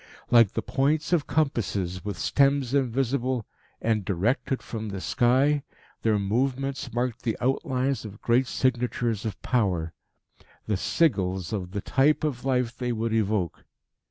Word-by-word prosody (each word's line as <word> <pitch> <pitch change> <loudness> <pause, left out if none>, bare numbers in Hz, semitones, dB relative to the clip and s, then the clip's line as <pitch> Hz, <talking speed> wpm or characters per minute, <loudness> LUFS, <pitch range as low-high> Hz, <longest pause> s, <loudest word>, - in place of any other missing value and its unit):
Like 115 -4 +6
the - - -2
points 150 +5 +1
of 160 -4 +2
compasses, 100 - -1
with 105 -3 -4
stems 140 +1 +2
invisible, 130 -2 0 0.3
and 110 -2 0
directed 110 - 0
from 110 -2 -5
the 100 -1 -4
sky, 130 - +2 0.4
their 110 -2 +2
movements 130 +6 -1
marked 120 +1 -2
the 115 -3 -1
outlines 130 +1 0
of 105 -1 -9
great 120 +2 +2
signatures 120 -4 0
of 105 - -6
power 90 -9 0 0.7
the 110 - -1
sigils 95 - 0
of 95 -4 -3
the 100 +2 -4
type 140 +9 +2
of 140 -5 -2
life 125 -3 0
they 125 -1 -2
would 115 -1 -1
evoke. 105 -5 0
120 Hz, 140 wpm, -26 LUFS, 105-135 Hz, 0.7 s, Like